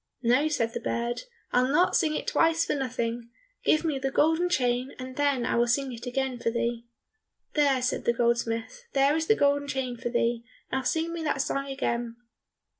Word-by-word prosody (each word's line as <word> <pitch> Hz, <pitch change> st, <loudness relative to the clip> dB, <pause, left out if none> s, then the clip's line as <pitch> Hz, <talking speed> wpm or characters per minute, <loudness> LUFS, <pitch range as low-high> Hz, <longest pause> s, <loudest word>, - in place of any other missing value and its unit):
"No," 250 Hz, +6 st, +3 dB
said 235 Hz, -7 st, -1 dB
the 235 Hz, -, -3 dB
bird, 235 Hz, 0 st, -2 dB, 0.3 s
"I'll 250 Hz, +1 st, +3 dB
not 325 Hz, +7 st, +3 dB
sing 310 Hz, -1 st, +2 dB
it -, -, -3 dB
twice 330 Hz, 0 st, +2 dB
for -, -, 0 dB
nothing! 235 Hz, -3 st, -3 dB, 0.3 s
Give 310 Hz, -, +3 dB
me 295 Hz, -4 st, 0 dB
the 270 Hz, 0 st, -1 dB
golden 320 Hz, +5 st, +2 dB
chain, 250 Hz, -4 st, 0 dB
and 255 Hz, 0 st, -7 dB
then 280 Hz, -4 st, +1 dB
I -, -, 0 dB
will 240 Hz, 0 st, +3 dB
sing 260 Hz, +2 st, 0 dB
it 235 Hz, +2 st, -8 dB
again 260 Hz, 0 st, -2 dB
for 230 Hz, -, 0 dB
thee." 235 Hz, 0 st, -2 dB, 0.7 s
"There," 280 Hz, -4 st, +3 dB
said 250 Hz, -, -1 dB
the 235 Hz, -, +3 dB
goldsmith, 235 Hz, -, -1 dB
"there 275 Hz, +2 st, +4 dB
is 320 Hz, 0 st, -1 dB
the 440 Hz, -, +5 dB
golden 285 Hz, -2 st, +2 dB
chain 260 Hz, -3 st, -3 dB
for 240 Hz, 0 st, -3 dB
thee, 235 Hz, -1 st, 0 dB, 0.3 s
now 265 Hz, -, 0 dB
sing 325 Hz, +5 st, -1 dB
me 340 Hz, -, -4 dB
that 275 Hz, -2 st, +1 dB
song 275 Hz, -1 st, -2 dB
again." 240 Hz, -4 st, -2 dB
260 Hz, 195 wpm, -27 LUFS, 235-290 Hz, 0.7 s, the